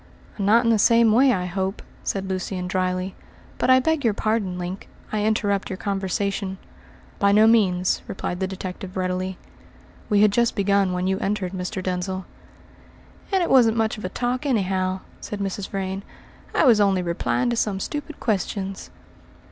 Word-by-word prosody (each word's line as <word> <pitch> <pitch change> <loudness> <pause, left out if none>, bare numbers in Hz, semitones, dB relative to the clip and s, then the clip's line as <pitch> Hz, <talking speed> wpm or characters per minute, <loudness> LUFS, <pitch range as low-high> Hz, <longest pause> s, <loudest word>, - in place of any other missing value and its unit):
"Not 215 +4 +4
in 230 - +3
the 220 - +3
same 230 +1 +5
way, 255 +4 +5
I 180 -5 0
hope," 190 +2 -3 0.2
said 195 -1 -2
Lucian 185 -1 -3
dryly. 185 0 -1 0.5
"But - - +1
I 260 0 +7
beg 315 +2 0
your 225 -4 +2
pardon, 210 -5 -1
Link, 180 +2 -6 0.2
I 215 -1 0
interrupt 205 -2 0
your 190 - -4
conversation." 195 0 -2 0.6
"By 200 0 +4
no 210 +2 +6
means," 190 -5 +3
replied 180 -2 -4
the 190 - 0
detective 185 0 -6
readily. 185 0 -2 0.7
"We 205 0 +4
had 210 - +5
just 235 +3 +2
begun 200 -1 +2
when 180 0 -1
you 190 +1 0
entered, 195 -2 -2
Mr. 185 0 -4
Denzil." 185 0 -3 1.1
"And 380 -2 +3
it - - -1
wasn't 235 -4 +5
much 220 -1 +1
of - - -10
a 185 - -2
talk, 250 +5 -2
anyhow," 190 -7 0 0.2
said 210 - -6
Mrs. 195 0 -3
Vrain. 195 0 -3 0.5
"I - - +4
was 230 -5 +6
only 195 -2 +3
replying 180 +8 0
to - - 0
some 210 -4 0
stupid 295 +7 -5
questions." 195 -3 -2
195 Hz, 170 wpm, -23 LUFS, 185-220 Hz, 1.1 s, I